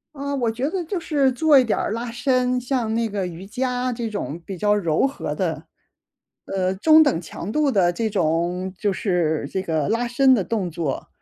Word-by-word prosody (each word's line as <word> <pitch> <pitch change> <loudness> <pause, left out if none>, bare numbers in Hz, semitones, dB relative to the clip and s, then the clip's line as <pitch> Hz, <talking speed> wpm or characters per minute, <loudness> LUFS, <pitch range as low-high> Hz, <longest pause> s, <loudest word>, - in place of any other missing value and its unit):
啊， 280 0 -4
我 240 -4 0
觉 250 +6 -2
得 370 +1 -2
就 360 +3 -3
是 290 -5 +1
做 290 +2 +5
一 - - +4
点 230 - 0
儿 - - -1
拉 230 +2 -3
伸， 250 +1 +1
像 245 -3 -1
那 230 0 +1
个 200 -3 -3
瑜 175 +2 -8
伽 250 +3 -2
这 230 -1 -4
种 185 -6 -4
比 195 - -6
较 205 +4 +2
柔 170 -2 +1
和 275 - -3
的， - - -2 0.8
呃， 190 -1 -1
中 315 +10 +6
等 265 - +1
强 175 +3 -7
度 300 +3 +2
的 185 -6 +3
这 225 +4 -1
种 180 0 -1
就 205 - +1
是 170 -7 0
这 190 - -1
个 160 -5 -1
拉 230 +3 0
伸 260 +2 +4
的 215 -6 +2
动 190 -2 -2
作， 155 -4 -3
225 Hz, 220 characters per minute, -22 LUFS, 185-255 Hz, 0.8 s, 中